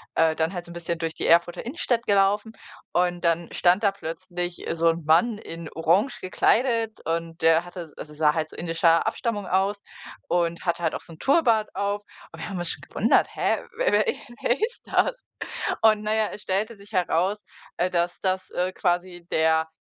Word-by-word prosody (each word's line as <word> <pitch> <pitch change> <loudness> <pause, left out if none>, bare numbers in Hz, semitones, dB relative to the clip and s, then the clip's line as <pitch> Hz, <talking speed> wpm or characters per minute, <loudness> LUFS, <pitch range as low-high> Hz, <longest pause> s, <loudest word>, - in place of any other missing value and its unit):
äh, 160 -1 +3
dann 160 +4 0
halt 175 -1 -5
so - - -13
'n - - -9
bisschen 170 -1 -4
durch 165 -1 -2
die - - -3
Erfurter 170 +4 +3
Innenstadt 245 -4 -1
gelaufen 205 +2 +2 0.4
und 175 -1 +1
dann 170 0 +1
stand 180 +3 +3
da 200 - +4
plötzlich 175 -1 -5
so 165 0 +3
'n 165 0 -1
Mann 175 +8 +4
in 165 -4 -8
orange 185 - +2
gekleidet 225 +3 +1
und 165 0 -3
der 165 +1 +4
hatte 175 -3 -8
also, 150 - -9
sah 150 0 +3
halt 155 -1 -2
indischer 165 0 +2
Abstammung 215 -6 -2
aus 195 +2 +1 0.5
und 170 -1 0
hatte 170 0 -1
halt - - +1
auch - - -5
so 170 - -9
'n 160 - -13
Turban 240 -7 +3
auf. 200 +1 -2 0.3
Und - - -12
wir - - -4
haben 190 -3 -4
uns 175 - -2
schon - - -4
gewundert: - - +2
„Hä, - - +1 0.2
wer - - +2
wer - - +4
wer 245 - -2
ist - - -9
das?“ - - +1 0.6
Und 215 -1 +5
na 215 0 0
ja, 220 -1 +2
es 210 - -8
stellte 210 +4 -1
sich 200 +2 -16
heraus, 185 +2 +1 0.4
äh, 180 - +2
dass 175 0 0
das, 185 -1 -1
äh, 180 +1 -1
quasi 175 -1 -1
der 160 0 +3
180 Hz, 195 wpm, -25 LUFS, 165-210 Hz, 0.6 s, Und